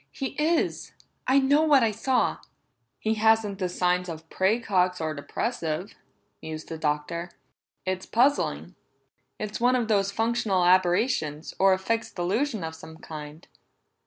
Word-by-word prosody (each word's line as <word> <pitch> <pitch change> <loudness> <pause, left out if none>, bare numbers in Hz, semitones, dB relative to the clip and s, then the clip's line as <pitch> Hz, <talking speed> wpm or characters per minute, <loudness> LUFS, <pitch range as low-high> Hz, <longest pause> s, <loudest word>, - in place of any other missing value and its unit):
"He 265 - -4
is. 330 +1 0 0.3
I 260 +2 +4
know 280 +2 +4
what 295 -5 +5
I 225 - +2
saw!" 245 +4 0 0.6
"He 220 - 0
hasn't 220 -2 +2
the 185 -2 -1
signs 180 0 0
of 160 0 -8
praecox 190 -3 +1
or 160 -1 -2
depressive," 165 - -3 0.5
mused 155 0 -7
the 160 - -6
Doctor. 155 +3 -2 0.6
"It's 185 0 -3
puzzling; 270 +5 +1 0.6
it's 215 +1 -5
one 250 +1 +4
of 240 -3 0
those 200 -2 +2
functional 220 -4 +1
aberrations, 175 - +2
or 195 0 +6
a - - +1
fixed 225 +4 -2
delusion 215 - -1
of 160 0 -4
some 160 0 -12
kind. 155 0 -9
190 Hz, 140 wpm, -26 LUFS, 170-230 Hz, 0.6 s, or